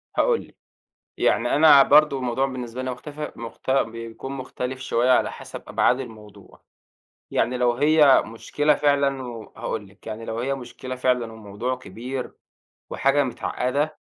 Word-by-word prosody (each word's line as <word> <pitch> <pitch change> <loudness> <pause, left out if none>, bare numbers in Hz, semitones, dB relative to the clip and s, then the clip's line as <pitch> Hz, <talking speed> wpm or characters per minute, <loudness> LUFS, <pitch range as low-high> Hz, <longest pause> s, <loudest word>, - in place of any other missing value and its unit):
هاقول 485 -2 +2
لِك، - - -23 0.6
يعني - - +2
أنا 145 -2 +8
برضه 150 0 +5
الموضوع 130 +1 0
بالنسبة 125 -2 -5
لي 130 - -2
مختف 150 +4 -7
مخت 115 +2 -8
بيكون 115 0 -2
مختلِف 130 -1 -5
شوية 125 -1 +1
على 125 - +3
حسب - - -9
أبعاد 125 +2 +2
الموضوع. 105 -5 -11 0.7
يعني 125 +1 +1
لو 125 -1 +2
هي 150 0 +5
مشكلة 145 +6 0
فعلًا 140 -2 +1
و 120 -3 -8
وهاقول 105 -3 -4
لِك، 95 +3 -22
يعني 110 +1 -6
لو 115 0 -4
هي 135 +3 -1
مشكلة 130 0 -7
فعلًا 125 -3 0
والموضوع 110 +3 -4
كبير 125 +2 -6 0.6
وحاجة 140 +1 +2
متعقّدة، 140 +3 -2
130 Hz, 145 wpm, -24 LUFS, 115-140 Hz, 0.7 s, أنا